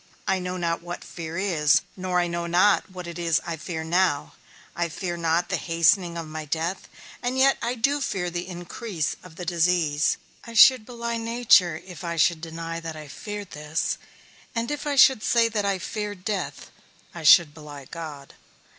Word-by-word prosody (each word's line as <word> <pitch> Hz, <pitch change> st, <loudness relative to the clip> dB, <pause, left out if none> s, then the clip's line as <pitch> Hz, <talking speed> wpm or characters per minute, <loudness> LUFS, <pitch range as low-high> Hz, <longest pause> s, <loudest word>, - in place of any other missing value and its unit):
I 190 Hz, -1 st, +2 dB
know 180 Hz, 0 st, -4 dB
not 170 Hz, -1 st, -1 dB
what 175 Hz, 0 st, -7 dB
fear 165 Hz, -1 st, -7 dB
is, 150 Hz, -7 st, +3 dB
nor 185 Hz, -1 st, 0 dB
I 175 Hz, -, +2 dB
know 170 Hz, 0 st, -3 dB
not 185 Hz, +5 st, +3 dB
what 180 Hz, -1 st, -8 dB
it 170 Hz, 0 st, -7 dB
is 165 Hz, -2 st, +2 dB
that -, -, -6 dB
I 165 Hz, -, -2 dB
fear 160 Hz, 0 st, -5 dB
now; 170 Hz, -2 st, +1 dB, 0.4 s
I 170 Hz, -1 st, -1 dB
fear 175 Hz, +1 st, -4 dB
not 170 Hz, +1 st, 0 dB
the -, -, 0 dB
hastening 170 Hz, +1 st, +2 dB
of 165 Hz, -, -4 dB
my 155 Hz, 0 st, -6 dB
death, 165 Hz, +5 st, -3 dB, 0.3 s
and 250 Hz, +1 st, -2 dB
yet 270 Hz, +1 st, +4 dB
I 240 Hz, +2 st, -1 dB
do 280 Hz, +5 st, +1 dB
fear 180 Hz, -8 st, -2 dB
the 175 Hz, +1 st, -4 dB
increase 175 Hz, -1 st, -4 dB
of 180 Hz, -3 st, -14 dB
the 180 Hz, -, -7 dB
disease; 170 Hz, -3 st, +2 dB, 0.3 s
I 230 Hz, -1 st, -10 dB
should 250 Hz, 0 st, +7 dB
belie 235 Hz, -1 st, -3 dB
nature 225 Hz, -8 st, +3 dB
if 180 Hz, -2 st, -10 dB
I 170 Hz, -1 st, -3 dB
should 165 Hz, 0 st, +2 dB
deny 165 Hz, 0 st, -5 dB
that 165 Hz, -1 st, -6 dB
I 155 Hz, -1 st, -9 dB
feared 205 Hz, +6 st, -7 dB
this; 150 Hz, +1 st, -2 dB, 0.6 s
and 230 Hz, +3 st, -1 dB
if 295 Hz, 0 st, -4 dB
I 290 Hz, -, 0 dB
should 265 Hz, -3 st, +6 dB
say 230 Hz, +1 st, +3 dB
that 210 Hz, -2 st, -1 dB
I 200 Hz, -1 st, +1 dB
feared 205 Hz, 0 st, -5 dB
death, 205 Hz, -3 st, -4 dB, 0.4 s
I 170 Hz, -, -7 dB
should 155 Hz, 0 st, +7 dB
belie 150 Hz, -3 st, -10 dB
God. 150 Hz, -3 st, -8 dB
175 Hz, 190 wpm, -25 LUFS, 165-205 Hz, 0.6 s, should